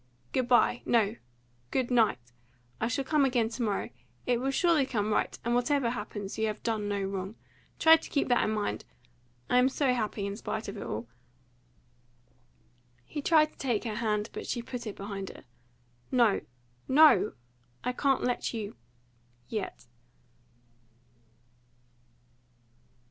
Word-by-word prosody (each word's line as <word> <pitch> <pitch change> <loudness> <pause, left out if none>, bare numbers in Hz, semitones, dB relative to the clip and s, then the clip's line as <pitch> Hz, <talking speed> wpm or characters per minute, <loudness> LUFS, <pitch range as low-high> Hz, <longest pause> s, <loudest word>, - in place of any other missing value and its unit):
Good 255 -2 0
bye 245 0 +4
no! 220 -2 +2 0.5
Good 255 -1 -1
night! 225 - +4 0.6
I - - +1
shall 255 +3 -1
come 300 +1 +3
again 245 -4 +2
to 235 - -6
morrow. 210 -4 -1 0.3
It 245 -1 +2
will 265 +2 -1
surely 305 -1 +3
come 215 -4 0
right, - - 0
and, 235 - +1
whatever 245 0 +2
happens, 205 -3 -5
you 220 - +2
have 215 0 -4
done 215 -3 -1
no 200 -1 -1
wrong. 195 +1 -4 0.4
Try 320 0 +8
to 325 - -10
keep 280 - +1
that 245 - +4
in - - 0
mind. 215 -1 -2 0.6
I 250 - +4
am 255 +1 +5
so 265 -1 +1
happy, 215 -4 -2
in 200 0 -3
spite 220 - -4
of 200 - -5
all!" 110 +2 -4 2.0
He 295 - -5
tried 310 0 +4
to - - -28
take 245 -6 0
her 225 -3 -3
hand, 215 -2 -1
but - - -6
she 240 - -2
put 245 -1 -6
it 210 - -5
behind 195 -1 -5
her. - - -12 0.7
"No, 235 -5 +3 0.5
no! 260 -8 +6 0.5
I 250 - 0
can't 270 +1 +1
let 245 -1 -1
you 210 - -5 0.7
yet!" 210 - -4
235 Hz, 150 wpm, -29 LUFS, 210-260 Hz, 2.0 s, Try